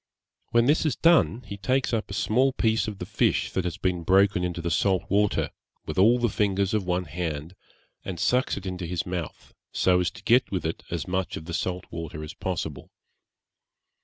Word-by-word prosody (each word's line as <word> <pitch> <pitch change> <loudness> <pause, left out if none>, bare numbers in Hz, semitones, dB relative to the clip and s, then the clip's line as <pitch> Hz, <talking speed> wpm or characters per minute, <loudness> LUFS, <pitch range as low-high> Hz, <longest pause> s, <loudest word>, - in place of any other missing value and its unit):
When 120 0 +3
this 145 +5 +3
is 155 -6 +1
done, 165 -8 +3
he 100 -1 -7
takes 130 +5 0
up 110 -1 -1
a 100 - -5
small 130 +7 +2
piece 110 -3 +1
of 105 -2 -5
the 90 - -5
fish 100 +2 +1
that 95 - -1
has 90 - -3
been 90 -2 -1
broken 95 +1 +3
into 90 -1 -2
the 85 0 -2
salt 95 +2 +2
water, 105 0 +1 0.3
with - - -3
all 115 +6 +6
the 120 -1 +1
fingers 100 -2 0
of 105 -2 +1
one 90 0 +1
hand, 80 +1 -4 0.5
and 90 -3 -5
sucks 125 +6 +1
it 100 - -7
into 90 -2 -4
his 85 0 -2
mouth, 90 -3 -6 0.2
so 90 -1 +3
as 90 - +1
to - - -14
get 125 +2 +4
with 90 -5 -3
it 80 - -3
as 85 -3 -3
much 95 0 -2
of 80 - -8
the 85 - -6
salt 90 +1 -2
water 80 -2 -6
as 75 - -7
possible. 80 -6 -4
95 Hz, 205 wpm, -26 LUFS, 85-110 Hz, 0.5 s, all